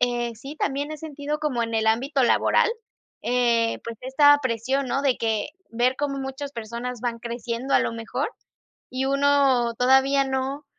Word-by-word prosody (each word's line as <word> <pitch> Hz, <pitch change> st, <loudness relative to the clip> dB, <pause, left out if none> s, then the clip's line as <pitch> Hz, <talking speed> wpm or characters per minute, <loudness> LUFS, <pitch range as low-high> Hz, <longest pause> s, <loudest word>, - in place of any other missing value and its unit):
eh, 240 Hz, -1 st, 0 dB
sí 275 Hz, +7 st, -9 dB
también 285 Hz, 0 st, -2 dB
he -, -, -5 dB
sentido 300 Hz, -1 st, -4 dB
como 295 Hz, -6 st, -1 dB
en 230 Hz, 0 st, -3 dB
el 220 Hz, 0 st, +1 dB
ámbito 265 Hz, +5 st, +2 dB
laboral, 255 Hz, -, +3 dB, 0.5 s
eh, 235 Hz, -2 st, +1 dB
pues, 230 Hz, 0 st, -6 dB
esta 290 Hz, +3 st, +5 dB
presión, 260 Hz, +3 st, -1 dB
¿no? 270 Hz, +2 st, -1 dB
De 270 Hz, -3 st, +2 dB
que, 220 Hz, -2 st, -1 dB, 0.2 s
ver 245 Hz, +3 st, +1 dB
cómo 285 Hz, -1 st, -1 dB
muchas 270 Hz, +1 st, -5 dB
personas 235 Hz, +1 st, -5 dB
van 235 Hz, -1 st, -2 dB
creciendo 235 Hz, +2 st, -3 dB
a -, -, +7 dB
lo -, -, -1 dB
mejor, 230 Hz, 0 st, -3 dB, 0.6 s
y 255 Hz, +1 st, -2 dB
uno 275 Hz, -4 st, +3 dB
todavía 265 Hz, +3 st, +4 dB
no 265 Hz, +2 st, -3 dB
260 Hz, 165 wpm, -24 LUFS, 235-275 Hz, 0.6 s, a